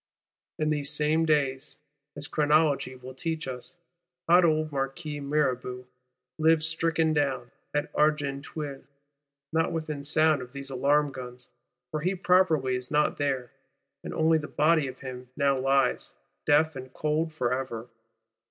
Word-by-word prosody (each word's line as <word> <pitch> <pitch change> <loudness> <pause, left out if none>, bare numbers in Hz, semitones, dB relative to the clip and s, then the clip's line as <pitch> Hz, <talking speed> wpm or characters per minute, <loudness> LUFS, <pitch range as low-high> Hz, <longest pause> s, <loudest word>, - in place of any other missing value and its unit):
In 155 0 0
these 145 -1 0
same 155 +2 +2
days, 140 -3 0 0.4
as 145 0 -1
Chronology 150 -3 +2
will 130 0 -10
teach 160 +3 -3
us, 130 +7 -7 0.5
hot 175 +2 +6
old 155 -2 +2
Marquis 145 +2 -3
Mirabeau 130 -3 -1 0.5
lies 160 0 +4
stricken 165 0 +1
down, 135 -5 -1 0.2
at 145 0 -2
Argenteuil,—not 145 0 -3
within 155 -3 -4
sound 155 0 +3
of 125 0 -10
these 140 0 -6
alarm 145 +3 +2
guns; 125 -1 -9 0.4
for 155 - -2
he 185 +4 0
properly 175 -8 +3
is 125 0 -5
not 150 0 +2
there, 135 -4 -1 0.5
and - - -5
only 160 0 +3
the 150 - -6
body 155 -1 +2
of 130 0 -9
him 125 -2 -8
now 140 -2 +2
lies, 135 0 +1 0.3
deaf 155 +1 +4
and 130 -1 -8
cold 155 +2 0
forever. 125 -4 -2
145 Hz, 135 wpm, -28 LUFS, 135-155 Hz, 0.5 s, hot